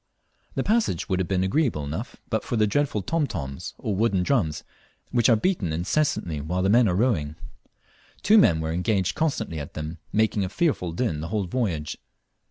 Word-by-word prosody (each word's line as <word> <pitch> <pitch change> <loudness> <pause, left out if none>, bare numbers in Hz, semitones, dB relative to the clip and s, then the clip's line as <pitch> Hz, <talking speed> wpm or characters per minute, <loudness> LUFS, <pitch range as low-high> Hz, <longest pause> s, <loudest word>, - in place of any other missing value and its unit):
The - - 0
passage 215 - +1
would 95 - 0
have 95 - 0
been 95 0 +1
agreeable 110 - +1
enough 80 - -5 0.2
but 110 -1 0
for - - -3
the 110 -1 +4
dreadful 110 -2 0
"tom 160 - 0
toms," 70 - -6
or 105 - -2
wooden 100 -3 +2
drums, 90 - 0 0.5
which 120 +1 +3
are 115 - +6
beaten 110 - 0
incessantly 85 - 0
while 90 +5 -1
the 95 - +2
men 120 +1 +5
are 90 - 0
rowing. 90 - +1 0.9
Two 215 +2 +6
men 80 - +4
were 80 0 -2
engaged 90 +1 0
constantly 115 - -1
at 70 - -8
them, 80 +2 -5
making 110 -1 +2
a 95 - -2
fearful 115 - 0
din 85 -5 -1
the 80 - -4
whole 100 +2 -1
voyage. 90 -7 -2
95 Hz, 185 wpm, -25 LUFS, 80-120 Hz, 0.9 s, are